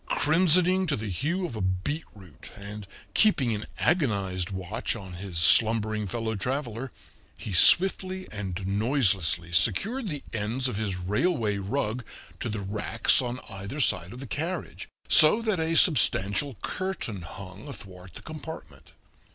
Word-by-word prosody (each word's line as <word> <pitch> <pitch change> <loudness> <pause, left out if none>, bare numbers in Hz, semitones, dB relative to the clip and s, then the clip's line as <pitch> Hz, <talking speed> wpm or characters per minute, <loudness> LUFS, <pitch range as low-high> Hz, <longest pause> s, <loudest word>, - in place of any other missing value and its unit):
Crimsoning 180 +4 +3
to 150 - +1
the 110 -3 -5
hue 170 - -2
of 160 - -6
a 110 - -4
beetroot 95 - -5
and 100 0 -9 0.3
keeping 140 - +3
an 105 0 -5
agonized 100 - 0
watch 95 +4 -3
on 95 -5 -9
his 90 -1 -6
slumbering 110 +5 +4
fellow 110 +3 -3
traveler, 125 +2 -3 0.5
he 105 - -6
swiftly 185 - +4
and 95 -3 -5
noiselessly 100 - +1
secured 195 - +1
the 150 -6 -5
ends 115 +4 -1
of 125 - -3
his 105 -3 -2
railway 105 - 0
rug 110 +3 -2 0.4
to 120 - -3
the 105 -1 -4
racks 105 +5 +1
on 125 0 -4
either 100 +9 -7
side 90 -8 +1
of 125 - -9
the 135 - -7
carriage, 165 +8 -5 0.2
so 155 +8 +7
that 215 -6 0
a 160 +1 +1
substantial 125 - +3
curtain 185 - -4
hung 95 - -10
athwart 90 - -11
the - - -10
compartment. 150 - -10
110 Hz, 145 wpm, -27 LUFS, 95-150 Hz, 0.5 s, so